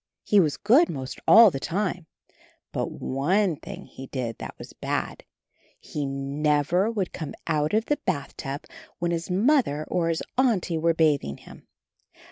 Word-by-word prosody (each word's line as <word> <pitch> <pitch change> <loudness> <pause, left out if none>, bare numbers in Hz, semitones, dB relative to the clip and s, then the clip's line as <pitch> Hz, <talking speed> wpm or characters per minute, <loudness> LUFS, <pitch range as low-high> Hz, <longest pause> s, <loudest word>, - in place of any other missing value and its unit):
He 205 - +4
was 155 -6 +2
good 260 +12 +4
most 130 -2 -5
all 225 -3 +9
the 135 - -4
time, 180 0 -2 0.6
but - - -2
one 175 +7 0
thing 190 +3 -9
he 135 - -10
did 120 -5 -4
that - - -8
was - - -11
bad - - -3 0.3
— - - -37
he 145 -2 -4
never 145 +7 +1
would 205 -6 -2
come 155 -4 -6
out 155 +2 0
of 220 +1 +2
the 295 - +1
bathtub 140 0 -4 0.3
when 175 0 -1
his 170 +1 -3
Mother 195 - +2
or 170 -2 +1
his 165 - -1 0.2
Auntie 200 -10 +2
were 165 +1 +2
bathing 145 - +1
him. - - -15
165 Hz, 160 wpm, -25 LUFS, 145-195 Hz, 0.6 s, all